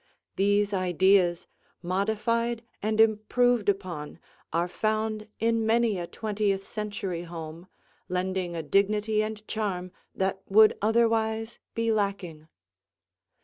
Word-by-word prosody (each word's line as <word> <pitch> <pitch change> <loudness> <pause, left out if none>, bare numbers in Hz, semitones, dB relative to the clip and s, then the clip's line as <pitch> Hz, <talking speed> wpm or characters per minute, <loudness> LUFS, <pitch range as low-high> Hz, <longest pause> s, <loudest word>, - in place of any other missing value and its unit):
These 205 +1 +2
ideas, 185 -1 +3 0.4
modified 220 +5 0 0.2
and 215 +1 -1
improved 225 +1 +3
upon, 180 -7 -3 0.3
are 170 +2 +1
found 215 +3 -1
in 230 0 +1
many 225 -3 +2
a 170 - -4
twentieth 205 -2 -1
century 205 -5 -4
home, 165 0 -8 0.4
lending 180 -1 -2
a 165 - -3
dignity 210 +6 +2
and 215 0 -5
charm 190 -5 -3 0.2
that 190 0 -1
would 215 +2 +6
otherwise 225 0 +1 0.2
be 230 0 +1
lacking. 195 -7 -2
205 Hz, 105 wpm, -27 LUFS, 185-220 Hz, 0.4 s, would